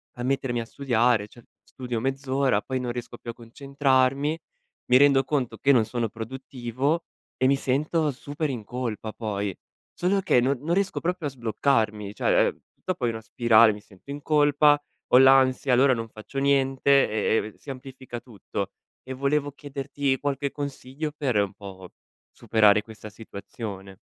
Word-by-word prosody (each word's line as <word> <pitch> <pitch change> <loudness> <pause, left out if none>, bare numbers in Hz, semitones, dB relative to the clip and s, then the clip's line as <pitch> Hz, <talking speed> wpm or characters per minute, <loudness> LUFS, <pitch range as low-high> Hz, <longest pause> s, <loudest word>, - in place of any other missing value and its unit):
a 120 - -6
mettermi 130 -2 -1
a - - -6
studiare, 120 -4 +1
cioè 120 +2 -17 0.2
studio 125 -1 -5
mezz'ora 135 -2 0
poi 130 -1 -3
non 125 -1 -3
riesco 120 0 -7
più - - -9
a - - -3
concentrarmi, 135 +3 0 0.5
mi 125 - +5
rendo 140 -1 +5
conto 135 -3 -2
che 140 - +3
non 120 -5 +4
sono 115 0 -2
produttivo 130 +6 -3 0.3
e 130 - +3
mi 140 - +4
sento 150 +4 0
super 145 +3 -4
in 120 -6 -5
colpa 115 -3 -4
poi. 100 -4 -3 0.4
Solo 190 +3 +1
che 180 -10 +3
no 130 +3 +2
non 160 +6 -2
riesco 195 +1 0
proprio 175 -3 -2
a - - -13
sbloccarmi. 110 -4 0
Cioè, - - +3
uhm, - - -12 0.2
dopo 180 -9 -2
è - - +2
una 110 -1 -5
spirale, 115 0 +5
mi 105 - -7
sento 105 +5 -14
in 145 +1 -6
colpa, 145 0 +4 0.3
ho - - +8
l'ansia, 135 0 +5
allora 130 +2 +5
non 115 -2 -4
faccio 110 +5 -10
niente 135 0 +3
e 110 +1 +1
e - - +2
v - - -26
si - - -14
amplifica 130 -2 -8
tutto. 115 -5 -6 0.3
E 130 - -6
volevo 140 +2 0
chiederti 140 -1 -3
qualche 140 -1 -2
consiglio 140 +1 -5
per, 135 -7 0
un 100 -2 +1
po', 95 -2 -10 0.4
superare 105 -1 +3
questa 110 0 -11
situazione. 100 -2 -9
130 Hz, 170 wpm, -25 LUFS, 115-140 Hz, 0.5 s, ho